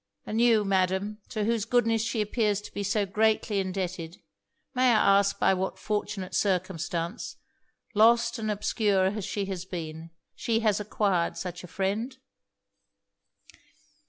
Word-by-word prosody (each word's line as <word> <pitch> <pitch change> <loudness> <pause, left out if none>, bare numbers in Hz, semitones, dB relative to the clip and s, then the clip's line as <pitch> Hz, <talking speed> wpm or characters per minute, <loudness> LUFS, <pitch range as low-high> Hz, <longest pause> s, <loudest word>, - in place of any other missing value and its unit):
And 220 +2 -1
you, 225 -3 +4
Madam, 190 +2 0
to 215 -3 -2
whose 225 0 +1
goodness 230 -1 +2
she 225 0 -1
appears 210 -1 0
to - - -12
be - - -3
so 200 +1 +1
greatly 215 +1 +1
indebted 185 -3 -3 0.6
may 255 -1 +3
I 200 -2 +5
ask 200 0 0
by - - +3
what 190 0 -2
fortunate 205 -3 -3
circumstance, 180 0 -1 0.6
lost 235 +2 +4
and 215 -1 -2
obscure 205 -2 +1
as 210 -4 -3
she 200 -1 -2
has 190 -3 -4
been, 165 -3 -6 0.2
she 225 -1 0
has 215 -2 +2
acquired 200 -4 0
such 180 -1 -5
a - - -8
friend?' 205 +8 -2
205 Hz, 140 wpm, -28 LUFS, 185-220 Hz, 0.6 s, I